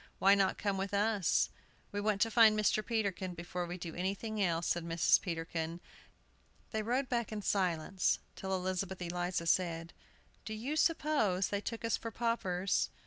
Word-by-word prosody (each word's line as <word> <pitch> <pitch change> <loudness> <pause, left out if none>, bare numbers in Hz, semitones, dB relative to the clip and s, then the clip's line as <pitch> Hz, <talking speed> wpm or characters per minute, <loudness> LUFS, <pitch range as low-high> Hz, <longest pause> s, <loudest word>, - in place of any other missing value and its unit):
"Why 195 +1 +6
not 195 -1 +2
come 200 -2 -1
with 195 +1 -2
us?" 205 -3 +2 0.4
"We 205 - -2
want 205 -1 0
to 225 - +3
find 220 -2 +6
Mr. 215 0 +2
Peterkin 200 -6 -2
before 175 +1 -4
we 175 +1 -5
do 170 -2 -6
anything 200 +4 -2
else," 170 -2 0
said 175 - 0
Mrs. 165 0 +3
Peterkin. 165 -1 -3 0.9
They 220 - -1
rode 250 +5 0
back 235 -2 -1
in 210 -1 -4
silence, 185 -1 +1 0.2
till 190 - -5
Elizabeth 185 0 -2
Eliza 175 0 -2
said, 165 -1 0 0.5
"Do 220 - -5
you 255 +8 -3
suppose 290 - +2
they 200 0 -1
took 230 +1 -4
us 230 - +1
for 230 - -5
paupers?" 200 -5 0
195 Hz, 165 wpm, -33 LUFS, 175-220 Hz, 0.9 s, Why